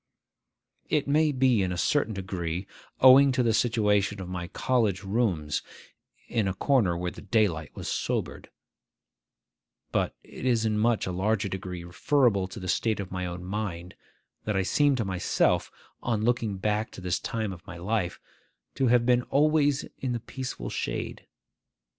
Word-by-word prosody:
It 150 -3 +1
may 150 +2 +3
be 130 -5 +3
in 95 -1 0
a 90 - -3
certain 115 - +1
degree 90 -2 -3 0.4
owing 135 +1 +8
to 125 - +2
the 115 -2 +2
situation 105 -3 +2
of 95 - -6
my 90 -1 -4
college 105 -2 0
rooms 95 -8 0 0.7
(in 110 -4 0
a 95 - -2
corner 105 -9 +2
where 90 0 -2
the - - -11
daylight 100 -7 0
was - - -6
sobered), - - -2 1.4
but - - 0
it - - -11
is 120 -3 +2
in 110 - +1
a - - 0
much 115 0 +2
larger 100 +4 0
degree 90 -2 -5
referable 100 +2 +2
to 95 - -9
the 95 - -6
state 110 +4 0
of 100 -2 -5
my 90 -1 -3
own 90 0 -6
mind, 90 -3 -4 0.5
that 105 - -1
I 95 - +2
seem 145 +8 +3
to 115 -4 -1
myself, 95 -1 +1 0.3
on 110 -3 -1
looking 115 -4 0
back 105 +2 -1
to - - -9
this 90 -1 -1
time 110 -4 -3
of 85 -2 -14
my - - -8
life, 95 0 -2 0.5
to 135 - +1
have 120 0 +4
been 125 0 +4
always 145 0 +3
in 130 -2 -2
the 120 - -2
peaceful 125 - -6
shade. - - -4
105 Hz, 165 wpm, -27 LUFS, 90-120 Hz, 1.4 s, owing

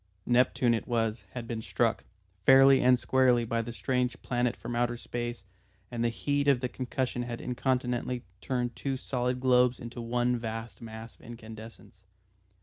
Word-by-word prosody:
Neptune 120 0 +3
it 115 - -2
was, 115 -3 -1
had 120 -2 -6
been 115 -1 -3
struck, - - 0 0.4
fairly 135 +3 +7
and 125 0 +5
squarely, 125 -1 +3
by 115 +1 0
the 115 +1 -6
strange 125 +3 -1
planet 120 -1 0
from 120 - -6
outer 120 0 0
space 120 -4 -5 0.5
and 120 -1 -2
the 120 - +3
heat 145 +4 -1
of 140 -3 +5
the 125 - -1
concussion 125 0 -3
had 120 -1 -4
incontinently 125 -1 -1 0.2
turned 125 -2 -2
two 135 -1 -2
solid 125 -1 -2
globes 125 -1 +3
into 120 0 -7
one 120 +1 +1
vast 115 +1 -6
mass 110 0 -8
of - - -23
incandescence. 110 -3 -11
120 Hz, 160 wpm, -29 LUFS, 115-125 Hz, 0.5 s, fairly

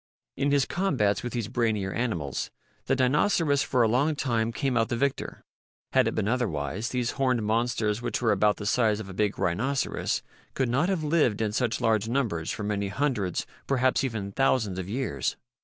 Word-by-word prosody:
In 140 +1 0
his 140 -1 +3
combats 130 - +1
with 120 - -5
these 120 -4 -2
brainier 110 -5 0
animals 95 - -2 0.4
the 135 - +3
Dinoceras 145 +3 +2
for 125 -4 +2
a - - +4
long 140 +7 +2
time 115 -5 0
came 130 +2 -1
out 115 -1 +2
the - - 0
victor. 140 +2 -2 0.5
Had - - +4
it - - -1
been - - 0
otherwise, 105 - -1
these 125 -2 -1
horned 125 -4 +1
monsters 110 0 0
which - - -2
were 115 -3 +2
about 105 -1 +3
the 105 - -6
size 110 -1 +2
of 105 -3 -7
a - - -7
big 105 +1 0
rhinoceros 130 +11 -1 0.3
could 130 -3 +1
not 140 +9 +2
have 185 -5 0
lived 150 -8 +2
in 110 -2 0
such 115 +1 0
large 110 -1 +2
numbers 115 - -1
for - - -3
many 100 -1 -1
hundreds, 105 - -1 0.2
perhaps 130 -1 +2
even 110 -6 -3
thousands, 110 -6 +1
of 95 0 -5
years. 105 - -2
115 Hz, 190 wpm, -27 LUFS, 105-135 Hz, 0.5 s, a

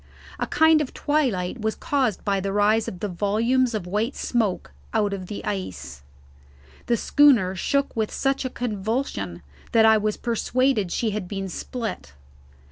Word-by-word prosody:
A - - -1
kind 320 -1 +4
of 285 - -5
twilight 250 -9 0
was 220 0 -1
caused 260 -8 -1
by 200 -1 +1
the 195 +1 -2
rise 210 +2 +2
of 180 - -7
the 210 - -1
volumes 225 +6 +1
of 210 - -3
white 210 +8 -1
smoke 220 -7 -1 0.2
out 205 -2 +2
of 185 -2 -5
the 205 - -6
ice. 75 - -5 0.9
The 235 - +2
schooner 235 -10 +4
shook 280 +9 0
with 220 -2 0
such 270 0 0
a 260 - -2
convulsion 210 - -3 0.3
that 225 -1 +6
I 220 -1 +6
was 210 0 -1
persuaded 235 -3 0
she 225 -3 0
had 205 -3 -4
been 195 0 -4
split. 225 - -5
215 Hz, 160 wpm, -24 LUFS, 195-250 Hz, 0.9 s, that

